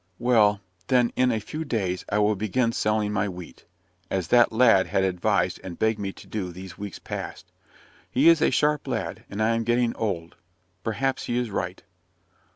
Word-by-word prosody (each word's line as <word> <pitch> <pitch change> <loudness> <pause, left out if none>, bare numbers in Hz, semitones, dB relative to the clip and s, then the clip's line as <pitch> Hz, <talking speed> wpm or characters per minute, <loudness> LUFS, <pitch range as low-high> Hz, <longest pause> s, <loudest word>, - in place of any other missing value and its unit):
"Well, 105 -4 +3 0.3
then, 125 -2 +3
in 130 0 +3
a 110 - 0
few 155 +9 -5
days 95 - -2
I 105 - 0
will 105 0 +3
begin 110 +4 0
selling 105 -2 0
my 105 0 0
wheat, 90 -2 -10 0.4
as 95 -3 -2
that 120 -1 +5
lad 110 -4 +5
has 95 - +1
advised 95 -1 0
and 90 -3 -7
begged 110 -1 +1
me 100 -1 -3
to - - -14
do 95 -5 -4
these 90 0 -9
weeks 100 +2 -7
past. - - -7 0.6
He 135 +6 +3
is 165 -2 +6
a - - +4
sharp 150 -1 +1
lad, - - -4
and 105 +2 -2
I 115 +1 +3
am 115 0 0
getting 120 0 +1
old. 90 -7 -3 0.5
Perhaps 135 +4 -1
he 120 - -1
is 120 -3 -1
right." 90 -1 -4
110 Hz, 185 wpm, -25 LUFS, 95-120 Hz, 0.6 s, is